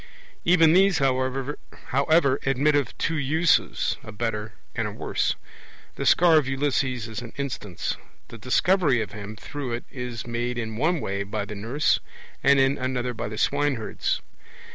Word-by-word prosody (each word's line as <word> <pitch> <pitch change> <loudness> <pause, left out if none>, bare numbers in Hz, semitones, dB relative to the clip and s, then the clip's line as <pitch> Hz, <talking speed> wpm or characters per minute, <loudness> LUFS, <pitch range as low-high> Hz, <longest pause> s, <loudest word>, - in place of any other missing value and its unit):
Even 165 -2 +6
these, 190 0 +5
however, 135 +2 0
admit 135 +3 +2
of 140 -5 0
two 160 +1 0
uses, 155 +4 +2
a 110 - -8
better 105 -1 -3 0.2
and - - -1
a - - -5
worse; - - -1 0.6
the - - -3
scar 170 -2 +6
of 140 - -3
Ulysses 135 -3 0
is 110 0 -5
an 120 -1 -9
instance; 125 -10 -3 0.3
the 115 - -10
Discovery 145 - +3
of 105 - -10
him 105 +1 -7
through 130 +3 -5
it 120 - -3
is 125 -2 -5
made 120 +1 -2
in 110 -2 -3
one 160 +6 +1
way 100 +1 -2
by 100 +1 -3
the 105 - -7
nurse 115 +9 +1 0.4
and 140 0 +6
in 135 +1 +3
another 125 -1 -1
by 110 - -4
the 110 0 -6
swineherds. 140 -3 0
130 Hz, 160 wpm, -25 LUFS, 115-145 Hz, 0.6 s, Even